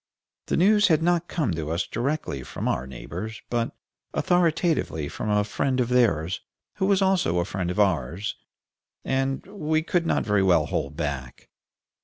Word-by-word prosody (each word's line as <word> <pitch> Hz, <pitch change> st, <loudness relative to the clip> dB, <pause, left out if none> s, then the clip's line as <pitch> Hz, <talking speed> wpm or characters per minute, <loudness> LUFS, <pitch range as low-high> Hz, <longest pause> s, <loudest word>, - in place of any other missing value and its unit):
The -, -, +1 dB
news 205 Hz, +4 st, +5 dB
had 160 Hz, -2 st, +3 dB
not 175 Hz, 0 st, +2 dB
come 150 Hz, -, -1 dB
to 80 Hz, -2 st, -3 dB
us 85 Hz, +3 st, 0 dB
directly 135 Hz, -, -2 dB
from -, -, -5 dB
our 65 Hz, +1 st, -1 dB
neighbors, 90 Hz, -, -7 dB
but 120 Hz, -1 st, -1 dB, 0.4 s
authoritatively 165 Hz, -, +1 dB
from 105 Hz, -, -4 dB
a 105 Hz, 0 st, +3 dB
friend 130 Hz, +5 st, -1 dB
of 125 Hz, -1 st, +1 dB
theirs, 95 Hz, -9 st, +2 dB, 0.4 s
who 190 Hz, -, +1 dB
was 195 Hz, -1 st, +3 dB
also 190 Hz, -, +2 dB
a 85 Hz, -, +1 dB
friend 95 Hz, -2 st, -3 dB
of 90 Hz, -, -2 dB
ours, 95 Hz, -, +1 dB, 0.7 s
and 135 Hz, 0 st, 0 dB
we 160 Hz, -5 st, -1 dB
could 170 Hz, 0 st, 0 dB
not -, -, +1 dB
very 105 Hz, -2 st, +3 dB
well 95 Hz, -2 st, +4 dB
hold 70 Hz, +2 st, -3 dB
back. 70 Hz, -6 st, -4 dB
115 Hz, 165 wpm, -25 LUFS, -, 0.7 s, news